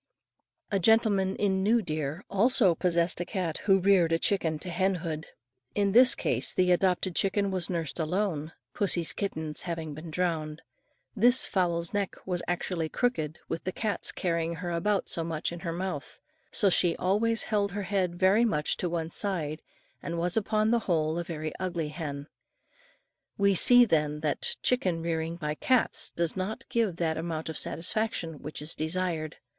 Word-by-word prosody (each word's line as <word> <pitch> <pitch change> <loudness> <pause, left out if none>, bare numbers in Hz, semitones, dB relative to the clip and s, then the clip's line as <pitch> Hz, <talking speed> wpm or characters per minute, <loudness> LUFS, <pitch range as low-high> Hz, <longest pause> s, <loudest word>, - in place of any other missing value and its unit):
A 200 - +1
gentleman 200 -2 +3
in 190 -2 0
New 220 +3 +2
Deer, 155 +2 -4
also 205 -2 +4
possessed 170 0 0
a - - 0
cat 180 -4 -3
who 195 -2 +5
reared 185 -3 +3
a 165 - +3
chicken 165 -4 +1
to 175 +4 -6
hen 190 +2 +1
hood. 160 -2 -5 0.5
In 200 -1 +1
this 250 +4 +8
case - - +2
the 180 -1 +2
adopted 180 0 +1
chicken 200 0 +1
was 185 -3 -2
nursed 170 -3 -3
alone, 165 -2 -1 0.2
pussy's 175 -5 0
kittens 160 -6 -4
having 165 -3 -5
been 155 +3 -9
drowned. 160 -2 -2 0.5
This 245 +4 +6
fowl's 170 -3 0
neck, 200 -2 -2
was 180 -2 -1
actually 175 -2 -2
crooked 160 -12 -1
with 165 - -4
the 185 - -2
cat's 205 -1 -1
carrying 170 -1 -2
her 175 +1 -5
about 195 +4 0
so 165 - -1
much 160 0 -3
in 170 - -7
her 170 -1 -4
mouth, 170 -4 -5 0.3
so 205 - +4
she 175 -2 +2
always 220 +5 +1
held 200 -3 -1
her 205 0 -3
head 185 -2 -1
very 190 +5 +3
much 155 -10 0
to 180 - -2
one 165 -1 -3
side, 165 -7 -2 0.4
and 170 0 -4
was 175 +1 0
upon 215 0 +1
the 235 - +3
whole 160 -1 +1
a - - -2
very 155 -2 -5
ugly 175 -4 -3
hen. 145 -3 -6 1.1
We 200 0 +3
see, 245 +6 +7
then, 150 -6 0
that 155 -2 +2
chicken 185 -10 0
rearing 165 0 -2
by 150 -3 -3
cats 255 +10 +1
does 170 -2 -2
not 190 +4 -4
give 225 -7 0
that 165 -2 -1
amount 160 -1 -4
of 160 - -4
satisfaction 170 -4 -1
which 150 0 -7
is 155 - -4
desired. 160 -1 -2
175 Hz, 170 wpm, -28 LUFS, 160-200 Hz, 1.1 s, this